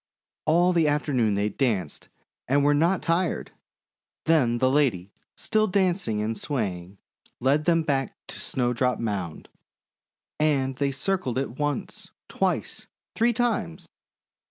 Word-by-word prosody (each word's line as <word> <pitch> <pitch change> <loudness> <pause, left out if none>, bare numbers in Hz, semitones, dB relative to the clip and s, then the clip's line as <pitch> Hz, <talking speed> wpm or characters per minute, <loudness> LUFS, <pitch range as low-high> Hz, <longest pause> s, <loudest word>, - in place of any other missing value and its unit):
All 175 +3 +4
the 165 -3 +3
after 150 0 0
noon 110 -5 +2
they 100 +1 0
danced 105 - -2 0.4
and 140 +2 +3
were 145 +1 +4
not 170 +6 +2
tired. 170 +1 0 0.7
Then 135 -8 +3
the 130 - +2
lady, 115 -10 +1 0.3
still 215 0 +1
dancing 180 - +1
and 110 +1 -2
swaying, 100 -8 -4 0.4
led 140 +4 +2
them 165 -1 +3
back 135 -4 -1
to - - -7
Snowdrop 125 0 0
Mound, 100 -8 -4 0.9
and 140 -4 +1
they 140 0 +1
circled 135 -2 -2
it 130 -1 -3
once, 145 -1 -3 0.2
twice, - - -2 0.3
three 235 +2 +3
times. 220 - -1
135 Hz, 130 wpm, -26 LUFS, 115-165 Hz, 0.9 s, All